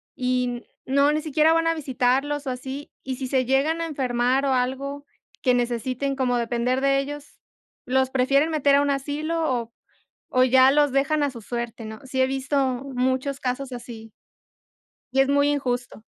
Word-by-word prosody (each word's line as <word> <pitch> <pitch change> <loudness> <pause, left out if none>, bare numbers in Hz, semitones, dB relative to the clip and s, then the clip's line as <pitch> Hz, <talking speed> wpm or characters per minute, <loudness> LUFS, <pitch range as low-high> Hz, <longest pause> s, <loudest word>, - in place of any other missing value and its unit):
y 250 -1 -1 0.2
no, 280 +2 +3
ni 305 0 0
siquiera 310 +1 +3
van 330 0 +2
a 330 - +3
visitarlos 275 +1 0
o - - 0
así, 265 +4 -6
y 260 -1 -4
si 265 -2 -4
se 260 -1 +1
llegan 280 +6 +1
a - - -1
enfermar 255 -1 0
o 270 - +2
algo 275 +3 -2 0.4
que 250 -2 +3
necesiten 245 +3 -1
como 250 -2 +1
depender 240 +2 0
de 275 0 +2
ellos, 290 +1 -5 0.6
los 260 0 +1
prefieren 275 +4 +2
meter 285 -3 +3
a - - +4
un 285 0 +1
asilo 300 +4 -2
o 235 -1 -4 0.6
o 255 0 +5
ya 260 +1 +6
los 290 -2 +3
dejan 295 +2 +2
a 285 - +1
su 235 -3 -10
suerte, 235 0 -5
¿no?, 220 0 -8
sí 260 0 -1
he - - +5
visto 270 +1 -2 0.4
muchos 260 +2 -1
casos 255 +1 -3
así. 230 -2 -9 1.0
Y 270 - +4
es 270 - +3
muy 285 +1 +3
injusto. 245 -5 -3
265 Hz, 180 wpm, -24 LUFS, 250-285 Hz, 1.0 s, ya